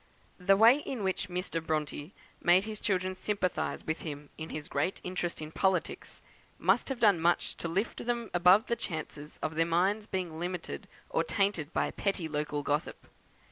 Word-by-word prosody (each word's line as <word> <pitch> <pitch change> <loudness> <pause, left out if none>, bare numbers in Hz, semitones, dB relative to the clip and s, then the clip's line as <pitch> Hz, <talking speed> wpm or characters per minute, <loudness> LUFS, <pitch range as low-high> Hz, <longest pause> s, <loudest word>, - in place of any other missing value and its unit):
The 195 +2 +4
way 230 +6 +7
in 260 -7 -4
which 190 -1 -1
Mr. 180 -2 -2
Bronte 155 +1 -3 0.3
made 180 +2 +5
his 215 0 -6
children 185 -2 0
sympathise 185 -1 -1
with 160 +1 -2
him 145 -2 -7
in 160 0 -6
his 150 0 -5
great 185 - -1
interest 175 -3 -3
in 155 - -7
politics, 185 -2 -1 0.3
must 190 - +2
have 270 - -2
done 205 -6 +5
much 170 +2 +2
to - - -3
lift 195 +7 -1
them 235 -2 -1
above 180 +4 +6
the 235 - 0
chances 155 -6 -6
of 155 - -1
their 165 +1 +3
minds 195 +6 +2
being 175 -4 -3
limited 175 - -4 0.2
or 165 - +2
tainted 175 -3 0
by - - 0
petty 195 -5 -1
local 150 -1 -2
gossip. 145 +2 -2
180 Hz, 175 wpm, -31 LUFS, 160-195 Hz, 0.3 s, way